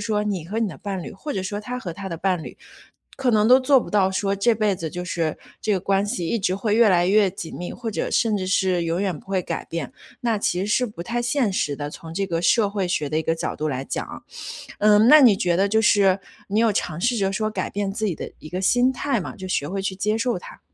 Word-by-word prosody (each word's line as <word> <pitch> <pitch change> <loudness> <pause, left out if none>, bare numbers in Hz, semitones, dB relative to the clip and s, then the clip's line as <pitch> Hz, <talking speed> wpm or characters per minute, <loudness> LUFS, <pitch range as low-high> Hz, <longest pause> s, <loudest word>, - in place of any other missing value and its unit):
说 210 -2 0
你 195 -6 -2
和 205 +7 -4
你 230 - +1
的 165 - -8
伴 195 -3 -4
侣， - - -7
或 290 +10 -6
者 190 - -3
说 205 +2 -3
他 250 +4 -5
和 180 -9 -5
他 195 +2 -7
的 170 - -4
伴 180 -1 0
侣， - - -9 0.6
可 260 -2 +1
能 215 -1 +3
都 255 +3 +7
做 270 +1 +5
不 - - -7
到 195 -2 +2
说 195 +1 0
这 200 +4 +3
辈 215 -3 +1
子 165 -3 -5
就 180 +2 -5
是 165 -3 -2 0.2
这 215 - 0
个 195 - +2
关 195 +2 +1
系 180 -4 -2
一 225 +7 -1
直 185 0 0
会 210 +1 0
越 230 -1 +6
来 175 -2 +3
越 200 -1 +4
紧 175 -3 -7
密， 175 - -5
或 235 -2 -6
者 215 - -2
甚 220 -3 +2
至 185 -1 -3
是 185 -2 +2
永 165 +2 -1
远 190 -4 -1
不 150 - -16
会 190 -1 +1
改 - - -4
变。 165 -5 -5 0.3
那 230 -3 +1
其 180 -3 0
实 190 - -1
是 245 +4 +2
不 175 -5 -8
太 240 +3 -2
现 245 -3 +1
实 145 -6 -1
的， 145 0 -4
从 160 +2 -9
这 195 +3 -1
个 170 -2 -2
社 210 +3 +3
会 200 -3 -2
学 150 -4 -1
的 155 - -2
一 - - -1
个 165 - 0
角 165 - -3
度 155 0 -2
来 135 -1 -3
讲 - - -3
啊。 - - -10 0.6
嗯， 210 +1 +5
那 305 +3 +9
你 235 -8 +7
觉 175 -3 +1
得 195 +3 +2
就 220 +2 +2
是， 200 -3 +4 0.3
你 210 +3 +1
有 230 -2 +3
尝 160 -5 -2
试 240 +4 +1
着 195 -1 +1
说 215 +2 -1
改 - - -3
变 200 -1 -2
自 220 +1 -2
己 185 - -1
的 - - -7
一 155 - -11
个 185 +3 -4
心 245 +6 +4
态 265 -2 -1
吗？ - - -7
就 190 - -7
学 145 -6 -1
会 195 +1 -3
去 190 0 -2
接 210 +3 0
受 230 -2 0
它。 - - -12
195 Hz, 300 characters per minute, -23 LUFS, 180-215 Hz, 0.6 s, 那